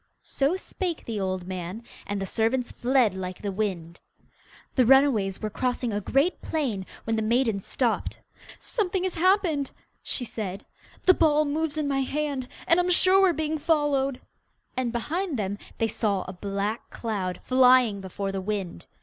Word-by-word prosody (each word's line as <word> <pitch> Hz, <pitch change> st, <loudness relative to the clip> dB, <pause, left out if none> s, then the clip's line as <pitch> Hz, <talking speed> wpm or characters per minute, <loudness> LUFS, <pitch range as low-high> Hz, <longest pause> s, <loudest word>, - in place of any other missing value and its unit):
So 280 Hz, +6 st, 0 dB
spake 365 Hz, -3 st, -4 dB
the 220 Hz, -3 st, -3 dB
old 185 Hz, -2 st, -2 dB
man, 185 Hz, +4 st, -5 dB, 0.2 s
and 205 Hz, 0 st, -2 dB
the 195 Hz, -, -2 dB
servants 230 Hz, +5 st, 0 dB
fled 245 Hz, -4 st, +2 dB
like 185 Hz, -1 st, -5 dB
the 200 Hz, -, -1 dB
wind. 185 Hz, -5 st, -3 dB, 0.7 s
The 255 Hz, -, +4 dB
runaways 240 Hz, -7 st, +4 dB
were 215 Hz, -, -2 dB
crossing 245 Hz, -1 st, -1 dB
a 205 Hz, -, -1 dB
great 275 Hz, -, +1 dB
plain, 240 Hz, -12 st, -2 dB, 0.2 s
when 225 Hz, 0 st, -1 dB
the -, -, +1 dB
maiden 225 Hz, -1 st, +2 dB
stopped. -, -, -1 dB, 0.4 s
'Something 380 Hz, -4 st, -1 dB
has 375 Hz, -, -1 dB
happened!' 340 Hz, -5 st, +2 dB, 0.3 s
she 245 Hz, -, -2 dB
said. 200 Hz, -3 st, -5 dB, 0.4 s
'The 370 Hz, -, +8 dB
ball 305 Hz, -3 st, +3 dB
moves 310 Hz, +1 st, -1 dB
in 300 Hz, -2 st, 0 dB
my 275 Hz, -1 st, +1 dB
hand, 280 Hz, -1 st, -2 dB, 0.2 s
and 335 Hz, -, +4 dB
I'm 355 Hz, 0 st, +2 dB
sure 370 Hz, +2 st, +5 dB
we 385 Hz, -, +6 dB
are -, -, +2 dB
being 315 Hz, 0 st, -1 dB
followed!' 290 Hz, -4 st, +1 dB, 0.6 s
and 255 Hz, -2 st, -1 dB
behind 310 Hz, -, -2 dB
them 205 Hz, -1 st, -2 dB, 0.2 s
they 225 Hz, -, +1 dB
saw 200 Hz, -3 st, 0 dB
a 185 Hz, -, -7 dB
black 200 Hz, +4 st, -3 dB
cloud 195 Hz, -6 st, -3 dB
flying 255 Hz, -5 st, +5 dB
before 195 Hz, +1 st, -4 dB
the 195 Hz, 0 st, -3 dB
wind. 195 Hz, -, -4 dB
245 Hz, 165 wpm, -26 LUFS, 200-300 Hz, 0.7 s, The